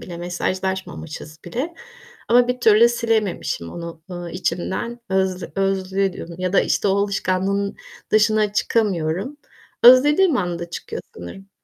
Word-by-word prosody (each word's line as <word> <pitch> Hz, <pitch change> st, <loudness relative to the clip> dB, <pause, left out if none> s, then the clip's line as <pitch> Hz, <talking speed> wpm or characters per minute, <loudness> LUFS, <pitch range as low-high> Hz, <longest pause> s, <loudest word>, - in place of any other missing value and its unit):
bile, 175 Hz, -2 st, -8 dB
mesajlaşmamışız 175 Hz, -3 st, -4 dB
bile. 260 Hz, -, -4 dB, 0.5 s
Ama 245 Hz, +1 st, +5 dB
bir 250 Hz, 0 st, -1 dB
türlü 225 Hz, +1 st, +6 dB
silememişim 220 Hz, -, -1 dB
onu, 170 Hz, -1 st, -8 dB
eee, 175 Hz, -1 st, -6 dB
içimden 185 Hz, +6 st, -3 dB
öz 190 Hz, -1 st, 0 dB
özlüyorum 195 Hz, -2 st, -1 dB
ya 185 Hz, 0 st, -2 dB
da -, -, +5 dB
işte 200 Hz, -, +1 dB
o 195 Hz, -, +2 dB
alışkanlığın 200 Hz, 0 st, -1 dB, 0.3 s
dışına 215 Hz, -1 st, +3 dB
çıkamıyorum. 200 Hz, -, 0 dB, 0.5 s
Özlediğim 295 Hz, +7 st, +7 dB
anda 175 Hz, -4 st, -3 dB
çıkıyor -, -, -6 dB
sanırım. 195 Hz, -, -10 dB
195 Hz, 120 wpm, -21 LUFS, 175-220 Hz, 0.5 s, Özlediğim